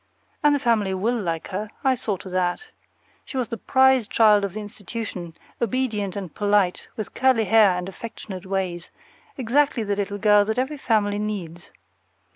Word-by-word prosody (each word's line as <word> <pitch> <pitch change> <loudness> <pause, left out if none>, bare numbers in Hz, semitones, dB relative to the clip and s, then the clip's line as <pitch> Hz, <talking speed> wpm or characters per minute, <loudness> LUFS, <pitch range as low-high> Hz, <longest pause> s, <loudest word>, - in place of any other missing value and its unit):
And 295 -1 +4
the - - 0
family 215 -6 +1
will 225 +5 0
like 165 -4 -3
her; 205 +3 -4
I 265 -1 +4
saw 215 -5 -2
to 190 - -10
that. 180 - -1 0.6
She 265 - -7
was 245 -3 -1
the 230 - -4
prize 260 0 +3
child 210 -2 +5
of 200 -3 -2
the 215 - -5
institution, 205 -4 -7 0.3
obedient 225 -5 -1
and 190 -6 -6
polite, 205 -3 +1
with 215 - -6
curly 260 -3 +3
hair 205 -2 +5
and 180 0 -4
affectionate 195 -2 -8
ways, 185 -3 -3 0.5
exactly 265 0 +2
the 205 -1 -1
little 200 0 -3
girl 210 0 +5
that 220 +2 -2
every 265 +4 -1
family 205 -4 +1
needs. 180 -6 -5
210 Hz, 170 wpm, -24 LUFS, 190-230 Hz, 0.6 s, child